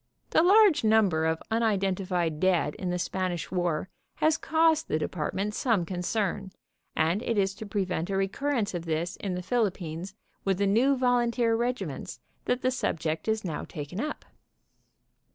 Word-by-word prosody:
"The - - +5
large 395 - +6
number 200 -8 +3
of 160 0 -1
unidentified 190 -7 0
dead 180 -5 +2
in 185 - -4
the 180 - 0
Span 185 +1 -1
ish 170 -2 -5
war 175 -2 -1 0.3
has 315 0 +3
caused 320 0 +2
the - - 0
department 185 +6 -2
some 215 -7 +1
concern, 190 +2 -2 0.4
and 165 +6 +1
it 230 -2 -1
is 195 -1 +2
to 215 +2 -8
prevent 185 -3 -2
a 195 - 0
recurrence 215 +3 -1
of 175 -1 -4
this 165 +1 -2
in 190 -3 -3
the 180 - -4
Philippines 185 -6 -2 0.3
with 195 -2 +1
the 200 - +1
new 245 +8 +3
volunteer 240 -2 +2
regiments 225 - -3 0.3
that 250 +1 0
the 255 - +2
subject 160 -10 -2
is 220 -1 0
now 160 -4 -3
taken 150 +6 -7
up." 300 +5 -4
195 Hz, 160 wpm, -28 LUFS, 175-235 Hz, 0.4 s, large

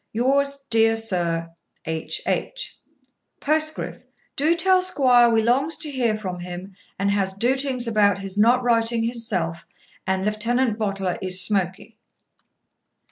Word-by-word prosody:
Yours, 275 +4 0
deer 225 0 +4
Sur, 170 -6 -2 0.3
'H. 160 0 -3
H. - - -3 0.6
'Poscriff. 310 +1 -1 0.3
Do'e 310 +5 +2
tell 370 +1 +4
squoire 255 -9 +4
we 225 -1 +2
longs 270 +7 +1
to 300 - -1
heer 240 -5 0
from 185 -4 -5
him, 180 +2 -8 0.2
and 200 +1 0
has 195 -1 -1
dootings 255 +2 0
about 210 -3 +3
his 195 -1 -6
not 240 +4 +4
writing 230 -1 +2
himself, 205 -9 -2 0.4
and 190 0 0
Lifetenant 230 +2 0
Bottler 195 -4 -2
is 185 0 0
smoky.' 195 +2 -1
225 Hz, 130 wpm, -23 LUFS, 190-255 Hz, 0.6 s, deer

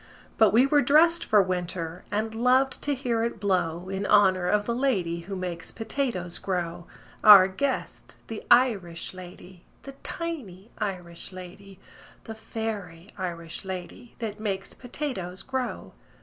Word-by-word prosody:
But 220 -2 +6
we 240 +4 +5
were 290 +1 +4
dressed 330 +4 +5
for 210 -3 +4
winter, 180 -2 -3
And 220 +2 -2
loved 255 +4 +2
to 290 -1 0
hear 240 -4 -1
it 230 -2 -3
blow 180 -3 0
In 195 +1 -3
honor 185 -3 +4
of 210 +1 +2
the 235 - -1
lady 200 -10 0
Who 190 +4 -7
makes 180 -3 -5
potatoes 220 -7 -3
grow 175 -2 -3 0.4
Our 200 -3 +10
guest, 260 +9 -3
the 225 -2 -7
Irish 205 -11 +3
lady, 180 0 -12 0.2
The 275 - -8
tiny 235 - -6
Irish 180 -4 -5
lady, 185 +1 -11 0.5
The 225 - -7
fairy 210 -6 -6
Irish 170 -3 -5
lady 190 +5 -8
That 215 -3 -5
makes 195 -2 -3
potatoes 245 -9 -5
grow. 260 -2 -4
200 Hz, 140 wpm, -26 LUFS, 180-235 Hz, 0.5 s, Our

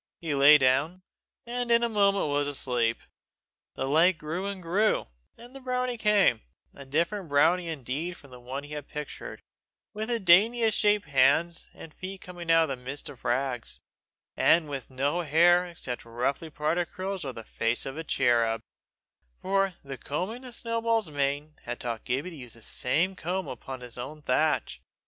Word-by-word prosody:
He 160 -3 -2
lay 140 +2 +8
down, 145 +7 +1 0.4
and 245 0 -3
in 235 0 +4
a - - +3
moment 200 -5 +2
was 145 0 0
asleep. 125 -5 0 0.8
The 130 - -2
light 165 +5 +4
grew 165 +6 -4
and 200 -1 -4
grew, 190 +5 +1 0.3
and 240 +2 -14
the 270 - -9
brownie 250 -1 -1
came 205 - +3 0.3
a 140 - -11
different 170 +6 -1
brownie 165 +5 +3
indeed 155 +3 -4
from 140 - -17
the 125 - -11
one 130 +3 -6
he 145 +1 -9
had 150 -1 -6
pictured 150 -2 -7 0.5
with 215 +2 -4
the 235 -1 +1
daintiest 220 +5 +5
shaped 210 -4 +2
hands 165 +4 +3
and 160 - -11
feet 190 +1 -7
coming 175 -2 -9
out 165 -1 +5
of 130 - -4
the - - -16
midst 135 +3 -5
of 130 - -13
rags, 125 -1 -1 0.6
and 165 -2 +4
with 140 -3 -5
no 140 +6 0
hair 175 +3 +4
except 135 -8 -6
roughly 125 +7 -2
parted 155 +3 -1
curls 190 0 -4
over 135 -2 -4
the 115 - -8
face 115 +1 -1
of 135 - -5
a 160 - -5
cherub 120 -6 +2 0.8
for 195 -1 +1
the 135 -2 -7
combing 190 - -4
of 245 -2 -7
Snowball's 230 -5 0
mane 145 0 0
and 155 0 -27
tail - - -26
had 120 0 -4
taught 115 -2 -4
Gibbie 140 +9 -2
to - - -10
use 125 -5 -10
the 115 - -7
same 170 +13 0
comb 185 +2 -3
upon 130 +1 -7
his 125 0 -6
own 150 +4 -7
thatch. 150 +4 +1
155 Hz, 180 wpm, -28 LUFS, 135-190 Hz, 0.8 s, lay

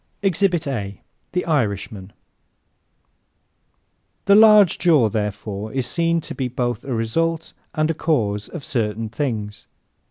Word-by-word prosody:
Exhibit 185 -3 +1
A 100 - -4 0.3
The 180 - -1
Irishman 105 - -1
¶ - - -20 2.1
The 200 - +5
large 210 -4 +7
jaw, 155 -10 +4
therefore, 105 0 -4
is 130 -2 -1
seen 165 +5 0
to - - -7
be 130 - -2
both 120 -2 -2
a 135 -3 -3
result 165 +9 -1 0.2
and 155 0 +1
a - - -1
cause 105 -11 -1
of 165 - -8
certain 115 -6 -2
things. 110 -5 -4
125 Hz, 130 wpm, -21 LUFS, 105-165 Hz, 2.1 s, large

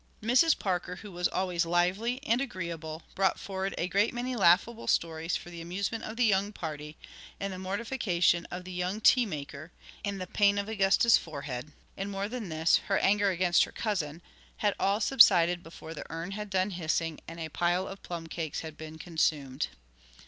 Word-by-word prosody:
Mrs. 255 +8 +4
Parker, 180 -2 -2
who 205 +2 -10
was 175 0 0
always 180 -2 0
lively 180 +9 +1
and 240 -2 +2
agreeable, 170 - -5
brought 195 0 +1
forward 195 0 -3
a 175 - 0
great 200 +5 +1
many 250 +1 -2
laughable 210 +4 +3
stories 165 0 0
for 175 - -6
the 170 -1 -8
amusement 200 +6 -3
of 220 +1 -7
the 245 - +4
young 200 -1 +2
party; 150 -5 -6 0.4
and 195 -1 -3
the 185 - -7
mortification 190 -4 0
of 180 +1 -6
the 185 - -8
young 180 +3 -2
tea 245 +2 +5
maker, 150 -1 -7 0.3
and 200 -1 -3
the 185 - -3
pain 200 +2 +3
of 200 0 -1
Augusta's 215 +2 +4
forehead, 145 -3 -6 0.2
and, 195 +1 -4
more 200 0 -2
than 225 -4 -5
this, 160 +1 +3
her 195 - +2
anger 205 0 +3
against 180 -1 +3
her - - -12
cousin, 175 -7 -3 0.3
had 205 -1 +1
all 200 +2 +2
subsided 180 -9 +6
before 165 -1 -10
the 150 - -8
urn 165 +3 -5
had 210 +1 -5
done 190 +1 +1
hissing 165 -2 -1
and 165 +1 -8
a 160 -1 -4
pile 175 +4 0
of 195 - -8
plum 170 -2 -6
cakes 160 -2 -4
had 160 -2 -8
been 155 0 -9
consumed. 155 -5 -1
185 Hz, 185 wpm, -29 LUFS, 165-205 Hz, 0.4 s, subsided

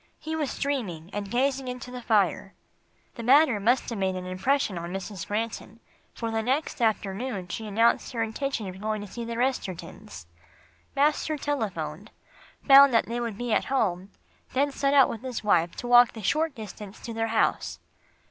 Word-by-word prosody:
He 315 +1 -5
was 300 -4 -2
dreaming, 205 - -3
and 205 -1 -4
gazing 265 +3 0
into 250 0 -6
the 250 0 -7
fire. 200 -4 +1 0.6
The 235 - -7
matter 260 -1 +5
must 240 +5 +2
have 225 - -4
made 190 -1 0
an 185 0 -5
impression 195 +5 0
on 170 +1 -6
Mrs. 190 -1 -6
Granton, 220 0 -4 0.4
for 230 -1 -3
the 225 0 0
next 265 +3 -1
afternoon 210 -2 -1
she 220 +4 -5
announced 225 +3 +2
her 230 -2 0
intention 225 0 -3
of 190 +1 -8
going 215 0 -2
to 205 - -7
see 235 +5 -7
the 230 0 -5
Restertons. 210 - -4 0.7
Master 300 +2 +1
telephoned, 200 - -3 0.6
found 275 0 +9
that 230 - +4
they 235 +2 -3
would 230 -4 -4
be 240 -1 -2
at - - +2
home, 195 -8 0 0.4
then 280 +2 +2
he 275 - -12
set 280 0 +1
out 270 -2 +7
with 225 - -6
his 255 -3 -5
wife 170 -5 +2
to 245 - -6
walk 245 -1 +7
the 220 - -9
short 310 +8 +1
distance 210 -2 -9
to 230 - -6
their 225 0 -1
house. 220 0 0
225 Hz, 185 wpm, -27 LUFS, 200-260 Hz, 0.7 s, found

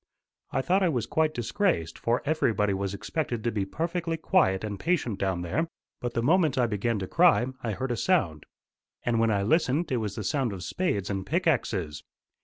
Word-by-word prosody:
I - - -1
thought 185 +8 +2
I 185 - +3
was 125 -7 -1
quite 160 -1 +1
disgraced, 120 - 0
for 120 +1 0
everybody 115 -9 +1
was 100 0 -2
expected 120 0 -3
to 120 - 0
be 100 -3 -1
perfectly 165 - -2
quiet 155 - +2
and 105 -2 -4
patient 145 - 0
down 95 -2 -1
there. 155 - -1 0.3
But 120 -1 -4
the 115 - 0
moment 160 -1 +3
I 125 - +4
began 115 +1 -1
to 95 -2 -4
cry, 170 - +4 0.2
I 115 -3 -2
heard 130 +5 -3
a - - 0
sound. 95 - +1 0.6
And 120 -2 +1
when 115 0 +3
I 100 -2 +1
listened 155 - +1
it 130 - +2
was 105 -3 -3
the 110 - -4
sound 125 +1 0
of 90 -2 -7
spades 100 - -1
and 95 -1 -2
pickaxes. 105 - 0
120 Hz, 200 wpm, -27 LUFS, 100-160 Hz, 0.6 s, I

